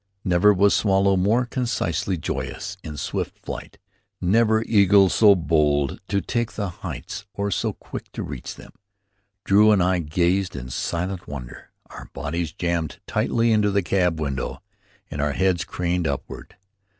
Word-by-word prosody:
Never 90 +2 +4
was 100 +1 +4
swallow 100 -1 +3
more 105 +7 +2
consciously 115 -7 -1
joyous 100 +4 -4
in 75 -2 -7
swift - - -3
flight, - - -8 0.4
never 110 +4 +3
eagle 100 -3 +5
so 105 0 +6
bold 75 -5 +1
to 100 - 0
take 120 +6 -2
the 100 -3 -3
heights 100 +3 -7
or 100 0 -2
so - - -1
quick - - -9
to - - -4
reach 70 -3 -7
them. - - -13 0.7
Drew 105 +2 +5
and 100 -4 +4
I 90 0 +2
gazed 90 +4 0
in 65 -2 -6
silent 90 +6 -3
wonder, 65 -4 -8 0.2
our - - -9
bodies 85 +1 -3
jammed 85 -2 -2
tightly 115 0 +1
into 105 -2 +3
the 100 -1 +1
cab 90 -2 +1
window, 70 -4 -3 0.5
and 70 - -3
our 75 -1 0
heads 95 -1 +1
craned 90 -1 -1
upward. 70 -1 -6
90 Hz, 150 wpm, -23 LUFS, 80-100 Hz, 0.7 s, so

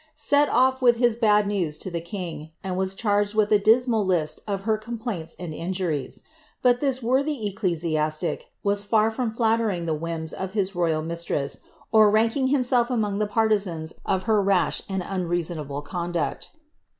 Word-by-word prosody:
^ - - -29
set 290 0 +3
off 260 +1 +3
with 240 -2 +5
this 240 -2 +3
bad 210 -3 +3
news 180 -7 -1
lo 185 - -4
the 170 - -2
l 180 +3 -5 0.2
.r.'. 160 - -13
and 190 -1 -3
was 190 +1 -1
charged 205 -1 0
with 215 -1 +2
a 210 - +6
dismal 225 +1 +3
list 165 -5 0
of 200 -2 -2
her 220 +2 +1
complaints 215 -6 -5
and 175 -3 -6
injur.f;: 170 -3 -3 0.4
btit 245 -1 +5
this 265 -3 -1
worthy 260 -3 0
ecclesiaslic 165 -4 -1 0.2
was 200 0 +1
far 220 +1 +2
from 230 0 -2
llallering 225 -6 +1
the 160 - 0
whims 160 0 -3
of 190 +3 -5
h.; 195 -1 0
royal 165 -3 0
mistress, 165 -4 -2 0.3
or 215 -1 +6
ranking 225 +5 +2
himself 250 -3 +2
among 210 -5 -1
the 210 - +1
partisaus 200 -8 0
of 190 0 0
her 215 -1 +2
rash 195 -2 +1
ar.J 190 -1 -2
uiirfasonable 170 -6 -3
conduct. 175 -1 -3
200 Hz, 175 wpm, -24 LUFS, 170-225 Hz, 0.4 s, a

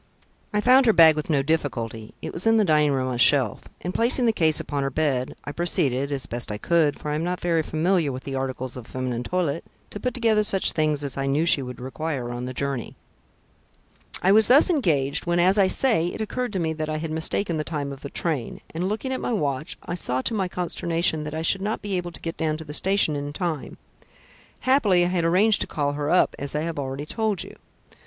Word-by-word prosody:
I 210 - +1
found 255 +2 +5
her 225 - +6
bag 160 -3 +7
with 155 +1 -4
no 140 -3 +2
difficulty 120 -8 -3
it - - -5
was 180 +6 -1
in 225 0 +5
the 215 - +3
dining 150 -3 +3
room 130 -1 0
on - - -2
a - - -3
shelf, 130 -3 +3 0.2
and 180 - -4
placing 240 +2 +2
the 225 - +3
case 160 -5 +2
upon 145 -1 -3
her 135 - 0
bed, 135 -3 -1
I 145 - -5
proceeded, 140 -5 -1
as 140 -2 -2
best 120 -2 -5
I 105 - -3
could, 155 +3 +2
for 150 - -5
I - - -1
am 155 +2 -1
not 180 +1 -2
very 170 -2 +1
familiar 160 0 0
with 130 0 -7
the 135 - -6
articles 130 -1 -4
of 125 -3 -9
feminine 125 -2 -3
toilette, 165 +1 -2 0.3
to 205 - -6
put 250 0 -2
together 225 -3 +2
such 195 -2 +2
things 155 -2 0
as 140 -2 -3
I 135 0 -1
knew 145 +4 +1
she 155 -4 +5
would 125 -1 -7
require 130 -1 -4
on 120 +1 -5
the 130 - -4
journey. 140 -3 -3 1.3
"I 190 - +4
was 215 +1 +6
thus 285 +8 +5
engaged 155 - +1
when, 175 0 +1
as 190 +4 +4
I 195 - +5
say, 205 -6 +2
it 175 - -5
occurred 240 +2 -3
to 190 - -1
me 160 -2 -1
that 155 0 -4
I 155 - -2
had 160 0 -4
mistaken 160 +2 0
the 155 - -1
time 145 -3 -4
of 135 - -12
the 140 - -7
train, 150 -8 -3
and, 175 +4 -2
looking 240 +5 -3
at 260 - -3
my - - -2
watch, 145 -7 -2
I - - -4
saw 130 -7 -1
to - - -1
my 195 -4 0
consternation 170 -2 0
that 150 +1 -5
I 160 - -3
should 190 +4 +2
not 210 +2 -3
be 200 -2 -2
able 175 -1 -3
to - - -11
get 165 0 -5
down 155 -1 -1
to 160 - -9
the 150 - -8
station 190 -2 +3
in 145 0 -4
time. 165 -5 -4 0.8
Happily 210 -10 +3
I - - 0
had 175 -2 0
arranged 200 +6 +4
to - - +1
call 145 -2 -1
her 145 0 -2
up, 180 - +3
as 140 +1 -4
I 150 - 0
have 165 -2 -3
already 135 +1 -4
told 215 0 -2
you." - - -12
160 Hz, 245 wpm, -24 LUFS, 140-185 Hz, 1.3 s, bag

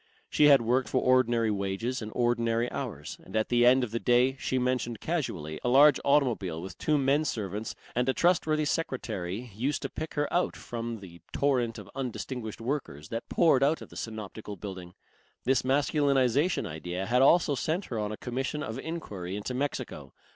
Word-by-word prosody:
She 150 - +4
had 140 -4 +7
worked 125 +3 +1
for 130 - +2
ordinary 120 -3 +3
wages 100 +6 -2
and 110 0 -6
ordinary 120 -1 +1
hours, 95 - -5
and - - -11
at 110 0 +1
the 120 0 +4
end 130 +1 +5
of 120 - -3
the 115 - -1
day, 125 +2 +3
she 130 - -1
mentioned 125 -3 -1
casually, 85 - -3
a 125 - +1
large 145 +4 +7
automobile 120 - +1
with 95 +3 -7
two 155 -1 +2
menservants 125 - -1 0.2
and 125 +2 +1
a - - +3
trustworthy 155 -3 +2
secretary 120 - -3
used 130 +8 -2
to - - -4
pick 155 0 -6
her 145 0 +1
out 175 +1 +1
from 115 -2 -5
the 85 -3 -12
torrent 125 -5 +1
of - - -9
undistinguished 125 -3 -5
workers 115 - -4
that 115 +1 -5
poured 155 -6 +4
out 145 +4 +3
of - - -13
the - - -13
Synoptical 110 -1 -6
Building. 95 -2 -8 0.5
This 130 +1 +3
masculinization 140 +2 +2
idea 90 +4 -4
had 125 +3 +2
also 150 +2 +5
sent 160 +7 -1
her 115 - -4
on 105 0 -2
a 110 - -5
commission 135 +4 -3
of 110 -1 -5
enquiry 100 - -5
into 105 +5 -4
Mexico. 125 - -4
125 Hz, 180 wpm, -29 LUFS, 110-140 Hz, 0.5 s, had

